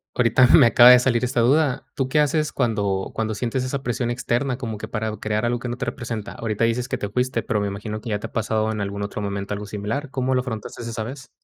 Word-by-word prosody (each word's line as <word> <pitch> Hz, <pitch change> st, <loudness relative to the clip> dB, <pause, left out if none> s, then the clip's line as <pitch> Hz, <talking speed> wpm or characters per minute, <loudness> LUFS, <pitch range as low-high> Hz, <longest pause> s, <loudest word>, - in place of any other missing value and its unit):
ahorita 125 Hz, +1 st, +4 dB
me 145 Hz, -, +7 dB
acaba 120 Hz, +2 st, +8 dB
de 125 Hz, -, +10 dB
salir 125 Hz, -1 st, +1 dB
esta 125 Hz, -1 st, +1 dB
duda. 135 Hz, +1 st, +2 dB
¿Tú 135 Hz, -2 st, -2 dB
qué 150 Hz, -, +2 dB
haces, 150 Hz, +1 st, +1 dB
cuando 100 Hz, -6 st, -1 dB
cuando 110 Hz, -1 st, -2 dB
sientes 125 Hz, +3 st, -2 dB
esa 135 Hz, +1 st, -3 dB
presión 120 Hz, -1 st, -1 dB
externa, 120 Hz, +2 st, -1 dB
como 115 Hz, -5 st, -5 dB
que -, -, -6 dB
para 110 Hz, -1 st, -3 dB
crear 110 Hz, +2 st, -1 dB
algo 120 Hz, 0 st, 0 dB
que 120 Hz, -, -5 dB
no 120 Hz, -, -4 dB
te 125 Hz, -, -3 dB
representa? 115 Hz, -3 st, -5 dB
Ahorita 110 Hz, -1 st, -2 dB
dices 115 Hz, +2 st, +1 dB
que -, -, -1 dB
te 105 Hz, -, -3 dB
fuiste, 125 Hz, +2 st, -1 dB
pero 105 Hz, -2 st, -1 dB
me 100 Hz, -, -1 dB
imagino, 105 Hz, +2 st, -5 dB
que 115 Hz, -, -7 dB
ya 105 Hz, -1 st, -1 dB
te -, -, -7 dB
ha -, -, -8 dB
pasado 110 Hz, -1 st, 0 dB
en 105 Hz, -1 st, -3 dB
algún 100 Hz, 0 st, -3 dB
otro 105 Hz, +1 st, -4 dB
momento, 100 Hz, 0 st, -3 dB
algo 105 Hz, 0 st, -5 dB
similar. 105 Hz, +8 st, -4 dB
¿Cómo 130 Hz, 0 st, -1 dB
lo 130 Hz, -, +2 dB
afrontaste 115 Hz, -3 st, -6 dB
esa 115 Hz, -1 st, -4 dB
vez? 130 Hz, +3 st, -8 dB
115 Hz, 255 wpm, -23 LUFS, 105-125 Hz, -, de